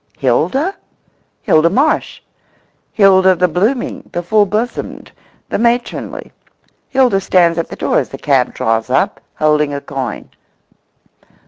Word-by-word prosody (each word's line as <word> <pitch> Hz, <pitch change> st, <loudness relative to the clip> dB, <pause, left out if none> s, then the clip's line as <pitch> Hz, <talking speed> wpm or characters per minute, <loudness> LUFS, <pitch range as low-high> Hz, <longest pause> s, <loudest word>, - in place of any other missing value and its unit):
Hilda? 180 Hz, -, 0 dB, 0.7 s
Hilda 160 Hz, +2 st, +3 dB
Marsh—Hilda 195 Hz, -, 0 dB
the 180 Hz, +1 st, +2 dB
blooming, 210 Hz, -, -2 dB
the 175 Hz, -, -3 dB
full 205 Hz, +3 st, +2 dB
bosomed, 220 Hz, +5 st, -4 dB, 0.4 s
the -, -, -2 dB
matronly. 235 Hz, +1 st, -2 dB, 0.6 s
Hilda 255 Hz, -7 st, +2 dB
stands 175 Hz, -3 st, +2 dB
at 165 Hz, -, -2 dB
the -, -, -7 dB
door -, -, 0 dB
as -, -, -4 dB
the 135 Hz, -, -8 dB
cab 135 Hz, -3 st, +1 dB
draws 115 Hz, +1 st, -1 dB
up, 130 Hz, -, 0 dB, 0.2 s
holding 150 Hz, -1 st, +1 dB
a -, -, -3 dB
coin. 135 Hz, -2 st, -6 dB
180 Hz, 120 wpm, -15 LUFS, 150-220 Hz, 0.7 s, Hilda